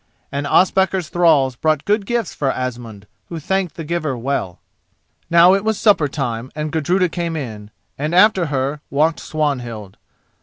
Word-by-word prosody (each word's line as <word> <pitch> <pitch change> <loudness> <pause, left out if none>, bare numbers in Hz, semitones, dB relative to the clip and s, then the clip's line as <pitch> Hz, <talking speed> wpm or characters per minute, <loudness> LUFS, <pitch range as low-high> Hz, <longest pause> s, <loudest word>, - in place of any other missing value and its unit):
And 140 +1 -3
Ospakar's 190 0 +2
thralls 155 -8 +3
brought 155 +2 0
good 205 -1 0
gifts 240 -4 -1
for 135 -2 -1
Asmund, 120 -5 -6 0.2
who 170 - -5
thanked 190 0 -2
the 165 - -6
giver 155 -4 -2
well. 120 -8 -3 0.7
Now 170 +2 +6
it 195 +1 +1
was 220 -1 0
supper 200 -9 +3
time, 130 -4 -4
and 155 0 -3
Gudruda 175 +4 +1
came 170 -1 -3
in, 110 -8 -6 0.3
and 155 +4 -1
after 185 -2 +4
her 140 +1 -2
walked 155 +3 +1
Swanhild. 120 -10 -3
155 Hz, 155 wpm, -19 LUFS, 130-175 Hz, 0.7 s, Now